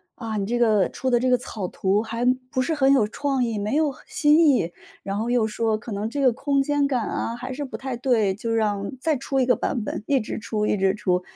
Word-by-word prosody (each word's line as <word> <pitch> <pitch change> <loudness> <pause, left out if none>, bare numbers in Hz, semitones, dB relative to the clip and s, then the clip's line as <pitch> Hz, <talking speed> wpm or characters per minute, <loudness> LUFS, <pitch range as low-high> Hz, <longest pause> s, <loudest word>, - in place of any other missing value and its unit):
“啊， 225 -2 -5
你 195 -1 -2
这 240 +2 0
个 220 -5 +3
出 260 - -3
的 240 - +4
这 255 +1 +1
个 250 - +4
草 220 -6 -5
图 195 +3 0
还 230 +2 -3 0.2
不 260 - -2
是 320 - -1
很 270 -3 +3
有 250 -7 +4
创 270 +3 -1
意， 230 -3 -2
没 210 +6 -1
有 305 -1 +2
很 - - -16
新 315 -1 +4
意。” 245 - +2 0.3
然 195 - -3
后 225 +2 -2
又 240 -2 +2
说： 220 0 0
“可 225 +2 -9
能 205 +2 -2
这 285 - -4
个 255 -3 +4
空 275 +3 +1
间 290 0 +1
感 250 -5 -1
啊， 230 - -3
还 255 +2 -6
是 290 +3 -4
不 270 - -6
太 265 -2 -4
对。” 235 -5 +1
就 230 +4 -4
让 210 -3 0
再 315 +3 +1
出 270 +1 -2
一 255 - +3
个 250 -1 +3
版 240 - -2
本， 210 - -4
一 275 -2 +3
直 215 - -5
出 215 -1 -2
一 - - +1
直 195 0 +1
出。 180 -3 0
240 Hz, 280 characters per minute, -24 LUFS, 215-270 Hz, 0.3 s, 的